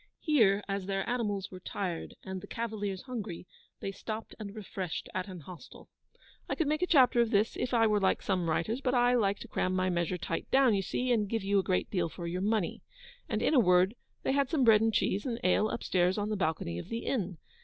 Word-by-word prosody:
Here, 215 - +3
as 195 -1 -3
their 195 -1 -1
animals 205 -6 -1
were 185 - -8
tired, 180 -2 -4
and 190 -1 -5
the - - -10
cavaliers 210 -5 -4
hungry, 220 -10 -6 0.4
they 195 - -3
stopped 215 +3 -6
and 205 -1 -7
refreshed 190 -4 -5
at 185 +1 -2
an 185 -3 -8
hostel. 180 - -12 0.6
I - - 0
could 325 - 0
make 305 +2 0
a 360 - +2
chapter 255 -6 +5
of 235 - +2
this 210 +1 +2
if 250 - -2
I 230 -2 +4
were 210 -1 +3
like 190 -1 +1
some 180 -4 0
writers, 215 +11 0
but 255 -1 +1
I 245 0 +4
like 205 -5 +2
to - - -7
cram 185 0 -1
my 185 0 +1
measure 175 +1 0
tight - - -4
down, 265 -3 +5
you 195 - +2
see, 250 +7 -1
and 210 -4 +2
give 225 -2 -1
you 200 0 +2
a - - 0
great 185 -1 0
deal 175 -4 0
for 170 +1 -7
your 175 +2 -2
money, 210 -3 0 0.5
and, - - -1
in - - +2
a 275 - +6
word, 180 -1 +4 0.3
they - - +1
had 275 -1 +2
some 310 -6 +2
bread 220 -3 +6
and 225 0 +3
cheese 205 -1 +1
and 235 -2 -2
ale 195 +4 +3
upstairs 185 -4 +1
on 205 0 -1
the 215 - 0
balcony 160 - -1
of - - -9
the 230 0 -4
inn. 190 -9 -1
205 Hz, 235 wpm, -31 LUFS, 185-235 Hz, 0.6 s, a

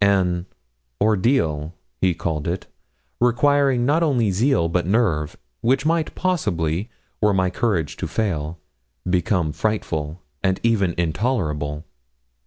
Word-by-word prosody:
An 95 -3 +2 0.5
'ordeal' 95 - +1 0.3
he 90 -2 +3
called 80 -2 -2
it, 90 +2 -2 0.5
requiring 130 +1 +3
not 150 +5 +3
only 125 -10 +2
zeal 110 -2 +2
but 85 +1 0
nerve, 95 -9 +1 0.2
which 135 +3 +2
might 165 -1 +1
possibly, 100 - -1 0.3
were 105 -2 +3
my 95 -1 +2
courage 90 -7 -1
to - - -3
fail, 85 -7 -2 0.5
become 90 -2 +1
frightful, 80 -5 -2 0.2
and 95 -1 +1
even 100 -7 +2
intolerable. 80 - -1
95 Hz, 115 wpm, -22 LUFS, 85-120 Hz, 0.5 s, he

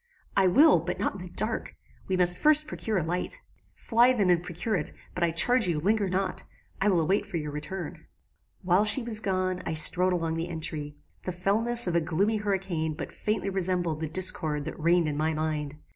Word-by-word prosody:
"I 195 -1 +4
will, 275 - +6
but 170 +3 -4
not - - -1
in 195 - -9
the 180 - -8
dark. 215 +2 -2 0.3
We 190 - 0
must 180 -1 +3
first 305 +6 +6
procure 220 -8 -3
a 175 - 0
light." 180 - -3 0.4
"Fly 240 +2 +3
then 200 -7 +2
and 170 -1 +2
procure 175 +5 -4
it; 155 -5 -3 0.2
but 180 - -2
I 170 - +3
charge 220 +7 +3
you, 165 -4 0
linger 205 +3 +1
not. 185 0 -2 0.4
I 200 - +2
will 180 -4 +2
await 190 +6 +1
for 190 -4 -4
your 150 -2 -4
return. 155 +4 -7 0.6
"While 185 +2 +3
she 215 +4 +3
was 230 -2 +1
gone, 185 -3 -1
I 160 - -3
strode 180 +4 +4
along 165 -2 -2
the 165 +2 -3
entry. 155 -3 -5 0.2
The 185 - -4
fellness 220 +7 +1
of 175 - -2
a 170 - +3
gloomy 195 +7 0
hurricane 190 -6 -2
but - - -7
faintly 210 -2 -2
resembled 180 -4 -1
the 160 - -2
discord 160 -4 -1
that - - -7
reigned 170 +1 +2
in 145 -1 -3
my 155 +1 0
mind. 150 -2 -3
180 Hz, 205 wpm, -27 LUFS, 160-200 Hz, 0.6 s, will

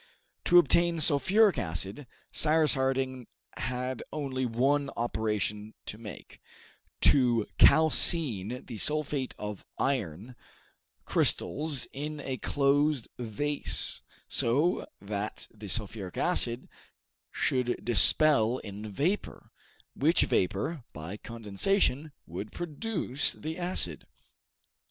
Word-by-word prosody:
To 175 - +6
obtain 170 +1 +4
sulphuric 190 +7 +3
acid, 95 - -2 0.2
Cyrus 155 0 +3
Harding 130 -2 -1 0.3
had 125 +2 -3
only 135 -4 -2
one 135 +5 +1
operation 105 -2 -2
to 105 - -6
make, 105 -4 -11 0.6
to 120 -5 +4
calcine 140 - +3
the 115 - -7
sulphate 145 - 0
of 105 -1 -6
iron 115 - -2 0.7
crystals 145 -3 +2
in 150 +2 -5
a 135 -2 -4
closed 145 -1 +1
vase, 140 +6 -1 0.3
so 145 +10 +1
that 100 +1 -4
the 105 -1 -10
sulphuric 100 -2 -2
acid 125 -9 +2 0.6
should 125 -2 -1
distil 120 0 +4
in 105 +1 -7
vapor, 175 - -2 0.4
which 160 +5 +3
vapor, 105 - -1
by 80 +5 -7
condensation, 125 - 0
would 95 +6 -7
produce 170 - -1
the 160 +1 -6
acid. 175 - 0
130 Hz, 95 wpm, -29 LUFS, 110-150 Hz, 0.7 s, To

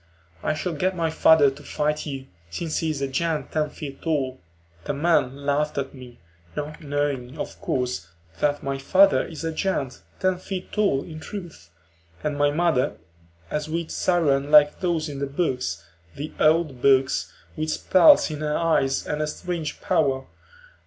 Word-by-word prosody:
"I 155 - 0
shall 175 +3 -3
get 185 +5 0
my 165 -2 0
father 160 -3 +5
to 135 - -12
fight 150 +1 -2
you, 135 -2 -5 0.2
since 160 - -3
he 160 - -1
is 145 -3 -2
a - - 0
giant 155 +3 -1
ten 155 -1 0
feet 140 -3 -8
tall." 140 -6 -1 0.5
The - - -2
men 140 -3 +1
laughed 150 +1 0
at 135 -1 -2
me, 125 -3 -12 0.4
not 150 +2 -5
knowing, 145 -2 -2
of - - -6
course, 125 -1 -2 0.3
that 145 0 +1
my 135 0 -2
father 190 +8 +5
is 165 -1 -8
a 165 - -1
giant 155 -6 -2 0.2
ten 185 -1 +1
feet 185 0 -6
tall 200 -11 +1
in 155 -2 -9
truth, 170 - -9 0.5
and 150 -1 -1
my 145 0 +3
mother 155 -3 +1 0.5
a 150 - 0
sweet 160 +2 -4
siren 145 -6 +1
like 150 -1 +6
those 170 -4 0
in 140 -2 -6
the 140 - -1
books, 125 - -2 0.3
the 150 +2 -6
old 155 -4 +3
books, 135 -1 +3 0.2
with 155 0 -2
spells 170 +1 +5
in 150 - -5
her 150 0 -1
eyes 140 -5 +1
and 150 +1 -2
a 155 - 0
strange 165 0 -4
power. 140 -7 +1
150 Hz, 170 wpm, -24 LUFS, 135-165 Hz, 0.5 s, like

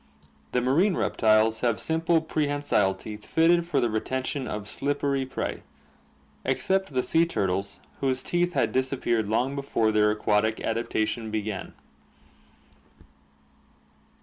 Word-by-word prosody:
The 125 - +1
marine 165 +10 +2
reptiles 110 0 +3
have 120 -2 0
simple 165 0 +1
prehensile 145 -11 0
teeth 105 +2 -9
fitted 170 +1 +3
for 150 -5 +1
the 120 - +2
retention 130 +4 -2
of 105 -1 -5
slippery 140 +1 -1
prey, 130 - -4 0.8
except 190 -6 0
the 125 - +2
sea 165 0 +4
turtles 100 - -1 0.2
whose 130 -1 0
teeth 175 0 0
had - - +1
disappeared 125 -5 0
long 125 +5 +1
before 135 -6 0
their 105 0 +3
aquatic 105 +1 +1
adaptation 110 -1 -1
began. 105 -2 -4
125 Hz, 120 wpm, -26 LUFS, 110-145 Hz, 0.8 s, sea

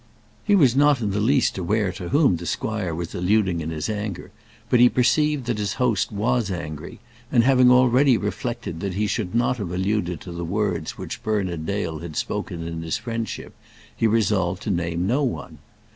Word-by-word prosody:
He 205 - +3
was 135 -10 +5
not 145 -1 +4
in 105 -4 -1
the 100 - -1
least 125 -1 +2
aware 100 +2 0
to 90 -1 -7
whom 140 - +3
the 85 +1 -7
squire 100 -2 -2
was 85 0 -5
alluding 90 -1 +1
in 80 - -4
his 80 -2 -3
anger; 105 -3 -4 0.4
but 125 0 +3
he 125 0 +7
perceived 150 +2 +2
that 120 -3 -2
his 105 -1 -1
host 125 -5 +1
was 110 +1 0
angry, 80 -5 -6 0.3
and 120 -4 +4
having 130 -1 +5
already 125 +1 +5
reflected 115 - -4
that 95 0 -3
he 105 +2 0
should 100 -1 -2
not 120 +1 +2
have 100 -6 -4
alluded 95 -2 -1
to 90 - -8
the 85 0 -5
words 95 +1 -2
which 95 +3 -6
Bernard 95 -8 -2
Dale 85 -6 -2
had 85 -1 -8
spoken 85 -1 -3
in 85 -1 -5
his 80 0 -2
friendship, 115 -2 -5 0.4
he 115 - +2
resolved 100 -4 +1
to 105 - -1
name 85 -1 -1
no 125 +9 +1
one. 90 - -3
105 Hz, 190 wpm, -23 LUFS, 85-120 Hz, 0.4 s, he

